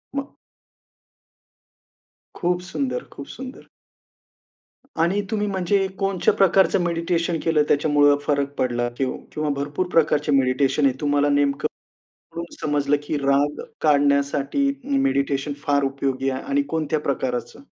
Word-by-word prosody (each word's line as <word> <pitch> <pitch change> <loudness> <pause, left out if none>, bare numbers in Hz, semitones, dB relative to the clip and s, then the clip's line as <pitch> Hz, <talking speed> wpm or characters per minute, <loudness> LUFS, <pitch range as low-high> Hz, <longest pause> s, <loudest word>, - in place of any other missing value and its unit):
मग. 275 0 -4 2.0
खूप 175 0 0
सुंदर, 135 -7 -2
खूप 140 - -8
सुंदर. 260 +1 -9 1.3
आणि 190 +5 +2
तुम्ही 210 -1 0
म्हणजे 195 0 +1
कोणच्या 195 -2 +1
प्रकारचं 190 -1 +3
मेडिटेशन 170 0 -1
केलं, 160 -2 +3
त्याच्यामुळं 145 -1 +4
फरक 140 -1 -1
पडला 120 -1 0
किंव 130 -1 -1 0.2
किंवा 150 0 -2
भरपूर 145 +6 -2
प्रकारचे 150 -2 +2
मेडिटेशन 135 +2 +2
आहे. 135 - +3
तुम्हाला 145 0 +2
नेमकं 140 -1 +1 0.7
कुठून 170 0 -4 0.2
समजलं 145 -1 +1
की 145 0 -2
राग 140 +1 +1 0.2
काढण्यासाठी 140 - +2 0.2
ही 280 +1 0
मेडिटेशन 140 - 0
फार 145 -2 +2
उपयोगी 135 -1 -1
आहे 130 - -3
आणि 140 0 +1
कोणत्या 155 -1 0
प्रकाराचं? 130 -2 -3
145 Hz, 120 wpm, -23 LUFS, 140-170 Hz, 2.0 s, त्याच्यामुळं